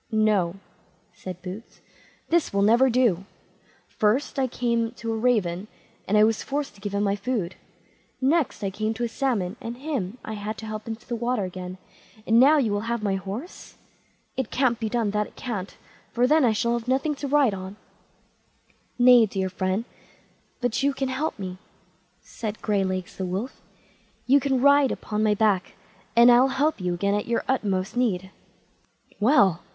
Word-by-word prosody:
"No", 210 -5 +2 0.6
said 185 -1 -9
Boots, 190 +5 -9 0.5
"this 335 -1 +2
will 200 0 +1
never 235 +5 +5
do; 230 -7 +2 0.6
"first 230 +7 0
I 260 - +2
came 235 -2 -1
to 230 -1 -4
a - - -2
raven, 215 -5 0 0.4
and 210 - +3
I 210 - +6
was 220 0 +2
forced 285 -2 -3
to 200 - -19
give 200 0 -4
him 200 - +1
my 200 -1 +1
food; 205 -4 -2 0.7
next 285 -2 +1
I 195 - -1
came 215 +3 -2
to 240 - -3
a - - +1
salmon, 230 -6 -1
and 230 +1 -6
him 255 - -3
I 220 - -5
had 210 +1 -5
to 220 - -8
help 215 0 -6
into 225 0 -6
the 240 - -3
water 235 -1 -1
again; 185 0 -6 0.5
and 225 +1 +4
now 290 +5 +7
you 240 -7 +1
will 205 +3 -2
have 235 -2 -2
my 200 -2 +1
horse. 195 - -6 0.6
It 265 - -2
can't 250 -3 +1
be 220 -1 -2
done, 225 -3 0
that 210 0 0
it - - -20
can't, 205 -6 -5 0.3
for 240 +2 +2
then 305 +1 +4
I 235 - +4
should 235 +2 0
have 235 0 -3
nothing 270 +4 +1
to 285 - -4
ride 275 -5 +3
on." 190 +1 -7 1.2
"Nay, 245 -2 +7
dear 190 -1 -2
friend, 185 +4 -2 0.8
but 245 0 0
you 280 0 +1
can 270 -1 -2
help 275 +5 -2
me", 185 -2 -6 0.6
said 215 -2 -6
Graylegs 190 -3 -1
the 190 - -3
wolf; 195 +8 -4 0.6
"you 275 +2 +5
can 265 -2 0
ride 280 -1 +5
upon 210 -1 -3
my 215 -1 +3
back, 205 -3 +1 0.4
and 235 +1 +8
I'll 245 +2 +6
help 275 -2 0
you 180 -1 -1
again 200 +3 0
in 205 - -1
your 235 0 0
utmost 200 -7 -1
need." 190 -7 0 0.9
"Well! 205 - +4
220 Hz, 180 wpm, -25 LUFS, 200-250 Hz, 1.2 s, and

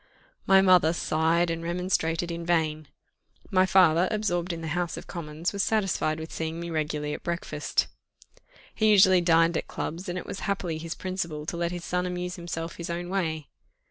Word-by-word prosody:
My 190 0 +6
mother 180 -4 +5
sighed 165 +1 +1
and 165 0 -3
remonstrated 170 -1 -1
in 170 0 -4
vain; 155 -3 0 0.6
my 185 0 +4
father, 180 -2 +5
absorbed 180 -4 -1
in 165 -1 -5
the 160 - -4
House 175 -1 -2
of - - -8
Commons, 165 +1 -4
was 200 - 0
satisfied 195 -7 0
with 160 +1 -7
seeing 160 +1 -3
me 170 0 -5
regularly 150 -1 -2
at - - -6
breakfast. 170 0 -1 0.9
He 215 -1 +2
usually 190 -3 +6
dined 165 -1 +4
at - - -4
clubs, 175 +4 -5
and 175 - -3
it - - -5
was - - -6
happily 180 -5 -2
his 165 +1 -5
principle 170 -5 -4
to 165 - -4
let 170 0 -1
his 175 -1 -6
son 180 0 -1
amuse 180 0 -4
himself 170 -1 -5
his 170 - -6
own 175 +1 -4
way. 160 -6 -2
170 Hz, 185 wpm, -27 LUFS, 160-180 Hz, 0.9 s, My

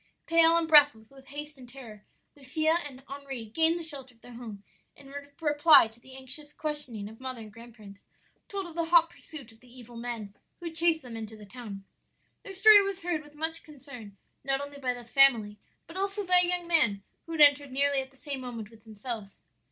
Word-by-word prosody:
"Pale 330 0 +5
and 330 -1 0
breathless 290 -8 +5
with 270 -1 -17
haste 290 0 -8
and 250 -1 -13
terror, 235 -5 -12 0.3
Lucia 310 +4 0
and 265 -2 -13
Henri 275 -4 -7
gained 320 +9 +1
the 340 - -6
shelter 270 -6 -7
of 225 - -32
their 245 - -13
home, 220 -4 -9 0.3
and 275 - -15
in - - -13 0.3
reply 295 -4 +6
to 220 +1 -18
the 260 +2 -15
anxious 265 +3 -12
questioning 295 -10 -4
of 220 +1 -13
mother 260 -2 -6
and 215 -1 -12
grandparents, 220 -4 -14 0.4
told 395 -1 -5
of 345 - -10
the 335 0 -1
hot 335 0 +5
pursuit 295 -9 -12
of 225 - -21
the 250 - -20
evil 245 -1 -13
men 230 -4 -5 0.3
who 345 - -10
had 330 -1 -6
chased 325 -2 +3
them 240 -2 -9
into 220 -1 -7
the 210 - -12
town. 205 -3 -9 0.6
"Their 395 - -10
story 410 +2 +8
was 390 -2 -4
heard 340 -3 -1
with 295 0 -18
much 320 +2 -3
concern, 260 -9 -12 0.3
not 270 0 0
only 285 0 -8
by 250 -2 -1
the 245 - -10
family, 230 -5 +3 0.3
but 330 - -11
also 395 +1 -2
by 360 0 +5
a - - 0
young 355 -1 -1
man 235 - +3 0.2
who 330 - -6
had 320 - 0
entered 285 -1 +5
nearly 280 +1 +1
at 265 - -9
the 270 - -25
same 275 -1 -6
moment 230 -4 -7
with 225 -1 -19
themselves. 215 -1 -8
275 Hz, 215 wpm, -28 LUFS, 230-320 Hz, 0.6 s, story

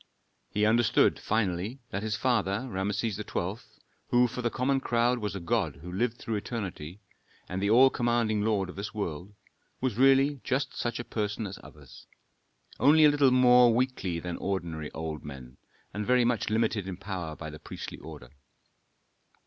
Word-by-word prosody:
He 105 +1 +1
understood, 115 +1 +3
finally, 105 +3 -1
that 100 - -3
his 110 0 -2
father, 115 -1 0
Rameses 100 0 -2
XII., 100 -1 -3 0.5
who 125 0 +4
for 125 - -5
the 120 - 0
common 135 +3 0
crowd 120 0 +1
was 105 -3 -3
a - - -3
god 85 - -1
who 85 +5 -10
lived 115 +5 -1
through 115 -2 -3
eternity, 100 -5 -6 0.5
and 90 +1 -4
the 100 - +1
all 130 +4 +6
commanding 120 -3 +1
lord 105 -3 +1
of 90 - -9
this 100 +2 -6
world, 95 0 -5 0.4
was 125 -3 -2
really 135 +1 +4
just 135 +2 -1
such 120 -1 -2
a - - -3
person 105 -1 -3
as 95 -1 -7
others, 70 -4 -15 0.7
only 155 +2 +6
a - - +8
little 145 -2 +4
more 125 -2 +6
weakly 120 -9 -1
than 90 +1 -5
ordinary 85 -6 -3
old 80 -1 -5
men, 65 -4 -10 0.4
and 105 0 -4
very 125 -1 +4
much 120 -2 0
limited 110 -3 0
in 95 -2 -5
power 95 -5 -5
by 80 -1 -7
the 75 - -10
priestly - - -8
order. 75 -6 -11
105 Hz, 170 wpm, -28 LUFS, 90-120 Hz, 0.7 s, a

